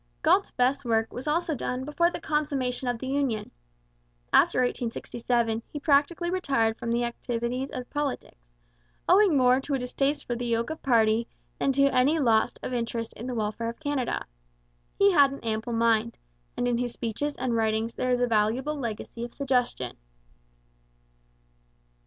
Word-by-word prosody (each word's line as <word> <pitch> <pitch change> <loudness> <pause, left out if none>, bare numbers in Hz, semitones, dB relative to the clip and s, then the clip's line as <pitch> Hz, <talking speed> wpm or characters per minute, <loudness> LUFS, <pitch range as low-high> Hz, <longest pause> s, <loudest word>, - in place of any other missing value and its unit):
Galt's - - +4
best 255 +3 +1
work 225 -2 0
was 255 +4 -6
also 325 +2 +1
done 255 -1 -3
before 340 +4 +2
the - - -6
consummation 275 -5 -1
of 245 -1 0
the 260 - -7
union. 265 -5 -1 0.8
After - - +5
1867 235 -1 -1
he 295 - -5
practically 310 +4 +2
retired 270 -12 +1
from 235 - -3
the 240 +1 +1
activities 240 +2 -3
of 250 -2 -6
politics, 275 - -4 0.6
owing 375 -4 +5
more 255 0 +5
to 280 +1 -2
a - - +1
distaste 275 +3 -1
for 240 - -2
the 240 +1 -3
yoke 230 +3 0
of 315 - -6
party 230 -2 +3 0.3
than 275 - +2
to 275 +1 +4
any 270 +6 +3
loss 230 -7 +2
of - - -4
interest 230 -1 -3
in 235 - -8
the 250 - -3
welfare 220 +1 -2
of 235 - -8
Canada. 285 -5 -2 0.7
He 400 0 +5
had 285 -6 +5
an 275 - -8
ample 225 +1 -2
mind, 230 0 +2 0.4
and 245 - 0
in 240 -1 +1
his 245 -1 -2
speeches 255 +6 -3
and 250 -2 -1
writings 220 0 0
there 255 - -2
is 250 0 +2
a - - +4
valuable 230 +6 +1
legacy 235 -2 -5
of 240 - -6
suggestion. 250 - -1
245 Hz, 165 wpm, -27 LUFS, 230-280 Hz, 0.8 s, After